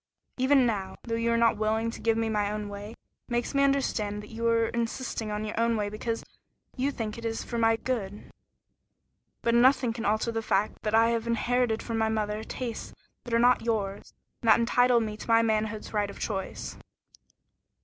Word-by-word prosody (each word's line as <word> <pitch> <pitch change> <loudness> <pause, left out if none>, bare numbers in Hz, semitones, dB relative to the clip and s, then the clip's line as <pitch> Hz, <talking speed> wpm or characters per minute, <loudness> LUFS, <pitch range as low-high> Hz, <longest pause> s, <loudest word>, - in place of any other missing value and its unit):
Even 260 0 +4
now, 200 -5 -2
though 230 - -4
you 230 0 +1
are 230 - +3
not 230 -2 +3
willing 220 +1 0
to - - -9
give 225 -1 +2
me 225 0 0
my 210 -2 0
own 210 -1 -4
way, 205 +2 -7
it - - -19 0.3
makes 240 +2 -1
me 275 - +3
understand 215 -7 0
that 210 - -12
you 230 +1 -2
are 230 -1 +3
insisting 235 -1 -3
on 210 +1 -3
your 230 +2 +1
way 205 -1 -1
because 225 +2 -3 0.5
you 265 +2 0
think 225 -5 -4
it - - -10
is 225 0 -2
for 235 - -4
my 225 0 +4
good. 210 -4 -4 1.1
But 235 - +2
nothing 250 0 +4
can 225 -1 -5
alter 215 +3 +1
the 225 0 -2
fact 210 -1 0
that 215 0 0
I 225 +1 +5
have 230 0 -1
inherited 235 0 +1
from 225 -1 -2
my 220 0 +2
mother 215 -1 -1
tastes 235 0 -6 0.3
that 240 - -5
are - - +5
not 245 +1 +4
yours, 210 -4 -2 0.3
and 230 - +1
that 220 - +7
entitle 245 +1 +4
me 215 -1 -3
to - - -9
my 230 0 +5
manhood's 215 -1 -1
right 205 -1 0
of 200 - -9
choice." 195 -3 -4
225 Hz, 200 wpm, -28 LUFS, 215-235 Hz, 1.1 s, that